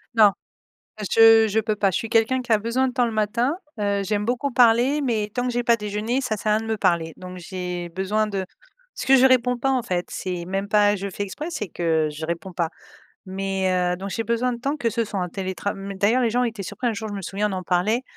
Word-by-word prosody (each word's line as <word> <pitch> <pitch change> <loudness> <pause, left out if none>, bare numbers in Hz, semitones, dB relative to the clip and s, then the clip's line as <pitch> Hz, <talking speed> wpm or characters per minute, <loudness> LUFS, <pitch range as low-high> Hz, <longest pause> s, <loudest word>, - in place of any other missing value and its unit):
Non, 210 -3 +7 0.8
je 225 0 +7
je 215 +2 +1
peux 215 -1 -2
pas, 200 -1 +2
je - - -2
suis 225 - -2
quelqu'un 230 +3 +2
qui 240 -2 -2
a 220 - +5
besoin 235 +5 0
de - - -5
temps 245 -2 +2
le 230 - -3
matin, 235 - 0 0.2
heu, 200 -1 0
j'aime 210 +1 -1
beaucoup 250 +5 -1
parler, 245 +4 +4
mais 220 -6 -1
tant 245 0 -1
que 250 - -1
j'ai 245 0 0
pas 235 -1 +4
déjeuné, 210 +4 -2
ça 255 -5 -2
sert 210 +1 0
à 210 - +4
rien 225 - -6
de - - -4
me 220 - +1
parler. 170 -5 +1
Donc 185 0 -9
j'ai 180 0 -5
besoin 190 +5 0
de 195 -2 -3 0.5
parce - - -5
que 270 - +7
je 260 0 +6
réponds 250 -1 +3
pas, 270 +3 0
en 255 -2 +1
fait, 180 -4 -2
c'est 180 -2 -4
même 195 +3 -3
pas 205 0 +4
je 200 +1 -4
fais 205 - -5
exprès, 295 - -6
c'est 215 - -4
que 160 -2 0
je 155 +2 -6
réponds 170 +2 -4
pas 170 -2 -1 0.6
mais 195 0 -1
heu, 180 -1 +1
donc 195 +2 -6
j'ai 225 - -2
besoin 235 +3 0
de 240 - -5
temps 280 +4 -1
que 245 -6 0
ce 230 0 -1
soit 205 -2 -4
en 180 - -2
télétra 190 +2 -4
même 195 0 -7
d'ailleurs 225 +6 +3
les 235 - +2
gens 245 +2 +1
étaient 225 -4 -3
surpris, 245 - -5
un 235 - +2
jour 220 +1 -5
je 205 - -6
me 200 - -5
souviens 200 +3 -2
on 190 - -2
en 185 - -4
parlait 185 +8 +1
210 Hz, 265 wpm, -23 LUFS, 190-235 Hz, 0.8 s, Non